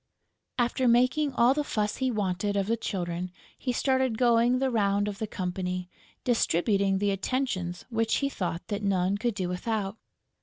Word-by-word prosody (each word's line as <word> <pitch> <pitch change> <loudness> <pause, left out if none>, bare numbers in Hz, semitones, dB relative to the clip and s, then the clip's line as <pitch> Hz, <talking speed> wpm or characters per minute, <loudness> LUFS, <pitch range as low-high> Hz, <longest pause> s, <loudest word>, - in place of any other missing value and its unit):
After 245 +1 +1
making 255 +5 +3
all 240 +2 +5
the 295 +1 0
fuss 210 -6 -1
he 260 -1 0
wanted 205 -2 -1
of 195 - +1
the 225 +3 +1
Children, 180 -5 -3 0.2
he 255 - -2
started 260 -2 +1
going 240 0 +4
the 265 0 +1
round 205 -2 +2
of 205 0 -5
the 220 - -2
company, 180 -2 -3 0.3
distributing 200 -3 +2
the 200 +1 +1
attentions 195 -4 -2
which 225 -1 +1
he 280 - +1
thought 180 -9 -4
that 205 0 -2
none 195 0 +1
could 235 -1 -1
do 185 -3 -2
without. 200 +2 -2
210 Hz, 165 wpm, -28 LUFS, 190-245 Hz, 0.3 s, all